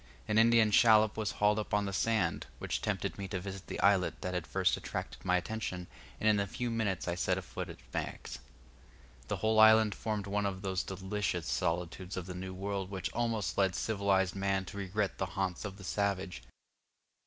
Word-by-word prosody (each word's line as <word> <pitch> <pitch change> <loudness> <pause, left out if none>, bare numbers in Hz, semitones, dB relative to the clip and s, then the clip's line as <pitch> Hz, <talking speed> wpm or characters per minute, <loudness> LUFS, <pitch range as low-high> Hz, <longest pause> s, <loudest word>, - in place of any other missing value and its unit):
An 105 +1 +3
Indian 115 -1 +5
shallop 110 -1 +6
was 110 -2 -2
hauled 105 +1 +3
up 105 - -1
on 105 0 +1
the 100 - -3
sand, 105 -5 +1
which - - -3
tempted - - -2
me 100 - -3
to 95 0 -3
visit 95 0 -7
the - - -5
islet 100 -2 +3
that 90 -1 -3
had 90 -2 -2
first - - +2
attracted - - -6
my 90 0 +3
attention, 90 -2 -4 0.3
and 110 - +1
in 105 -1 +5
a 100 - 0
few 120 +4 -3
minutes 105 -7 -1
I 85 - +1
set 90 +1 0
foot - - -6
upon - - -6
its - - -20
banks. - - -4 0.9
The - - -2
whole 110 0 +2
island 110 -1 +7
formed 105 -3 -3
one 100 0 0
of 95 0 -5
those 95 -1 0
delicious 95 -2 -2
solitudes 90 +8 -2
of 90 - -3
the 90 - -6
New 95 +1 -6
World 95 0 -3
which 95 -3 -4
almost 115 -6 -1
lead 95 -3 +3
civilized 100 -3 +1
man 95 -1 0
to 100 - -8
regret 100 +1 -2
the 95 - 0
haunts 95 0 -1
of 100 -1 -6
the 100 - -11
savage. 95 -6 -1
100 Hz, 200 wpm, -32 LUFS, 95-105 Hz, 0.9 s, island